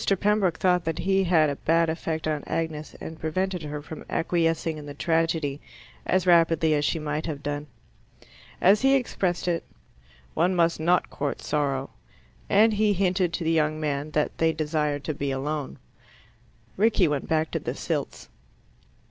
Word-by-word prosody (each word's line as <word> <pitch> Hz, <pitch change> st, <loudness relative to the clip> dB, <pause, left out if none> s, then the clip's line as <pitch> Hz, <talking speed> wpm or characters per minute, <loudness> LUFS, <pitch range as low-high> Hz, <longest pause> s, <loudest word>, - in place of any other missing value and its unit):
Pembroke 205 Hz, -5 st, +2 dB
thought 180 Hz, -2 st, +2 dB
that 165 Hz, 0 st, -2 dB
he 190 Hz, +2 st, +1 dB
had 160 Hz, -4 st, +3 dB
a 140 Hz, -, -5 dB
bad 165 Hz, +1 st, +2 dB
effect 160 Hz, 0 st, -3 dB
on 150 Hz, -2 st, -1 dB
Agnes, 160 Hz, -2 st, -3 dB
and 160 Hz, 0 st, -8 dB
prevented 180 Hz, +3 st, -2 dB
her 150 Hz, -1 st, -6 dB
from 155 Hz, +1 st, -9 dB
acquiescing 165 Hz, -2 st, 0 dB
in 145 Hz, -, -10 dB
the 145 Hz, -, -8 dB
tragedy 160 Hz, -3 st, 0 dB, 0.5 s
as 185 Hz, -1 st, +2 dB
rapidly 165 Hz, -2 st, +4 dB
as 145 Hz, -1 st, +1 dB
she 165 Hz, -, +1 dB
might 150 Hz, +1 st, -3 dB
have 145 Hz, -3 st, -5 dB
done. 145 Hz, +1 st, -3 dB, 0.9 s
As 200 Hz, +3 st, +5 dB
he 270 Hz, +1 st, +5 dB
expressed 190 Hz, -9 st, -1 dB
it, 170 Hz, -1 st, 0 dB, 0.7 s
"one 180 Hz, +3 st, +2 dB
must 170 Hz, -2 st, +2 dB
not 175 Hz, +3 st, +2 dB
court 145 Hz, 0 st, -3 dB
sorrow," 140 Hz, -3 st, -1 dB, 0.6 s
and 215 Hz, +2 st, +5 dB
he 210 Hz, 0 st, +2 dB
hinted 185 Hz, -2 st, +1 dB
to 170 Hz, -, -2 dB
the 165 Hz, -, +1 dB
young 155 Hz, -1 st, +1 dB
man 145 Hz, -1 st, -2 dB
that 150 Hz, 0 st, -1 dB
they 165 Hz, 0 st, +3 dB
desired 150 Hz, -2 st, -1 dB
to 155 Hz, -, -2 dB
be 140 Hz, 0 st, -3 dB
alone. 140 Hz, +1 st, -3 dB, 1.0 s
Rickie 205 Hz, -3 st, +3 dB
went 145 Hz, -2 st, -2 dB
back 160 Hz, -1 st, +1 dB
to -, -, -1 dB
the -, -, -4 dB
Silts. -, -, -4 dB
160 Hz, 165 wpm, -26 LUFS, 150-180 Hz, 1.0 s, As